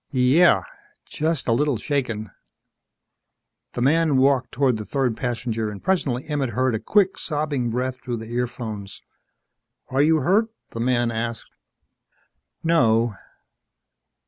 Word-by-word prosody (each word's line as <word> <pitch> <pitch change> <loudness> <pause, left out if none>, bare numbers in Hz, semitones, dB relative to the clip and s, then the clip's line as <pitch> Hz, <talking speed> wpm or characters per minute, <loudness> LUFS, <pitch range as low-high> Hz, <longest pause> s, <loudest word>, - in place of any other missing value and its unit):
"Y 130 - -2
Yeah. 130 - +5 0.4
Just 155 -1 -2
a - - +2
little 140 +2 +2
shaken." 110 -5 -2 1.4
The 120 - -1
man 155 +1 +3
walked 130 -1 +3
toward 130 -2 +1
the 105 - -5
third 125 +2 -1
passenger 115 -2 -2
and 105 -2 -9
presently 145 -9 0
Emmett 145 -4 -1
heard 130 -1 +2
a 110 - -1
quick, 195 - +2
sobbing 145 -5 -1
breath 130 +2 -2
through 120 -1 -4
the 110 +1 -8
earphones. 120 -5 -4 0.9
"Are 135 +2 +2
you 155 +1 +4
hurt?" 200 - +3 0.2
the 115 - -6
man 120 0 +1
asked. 115 0 -4 1.1
"No." 115 -9 +3
125 Hz, 130 wpm, -23 LUFS, 115-145 Hz, 1.4 s, Yeah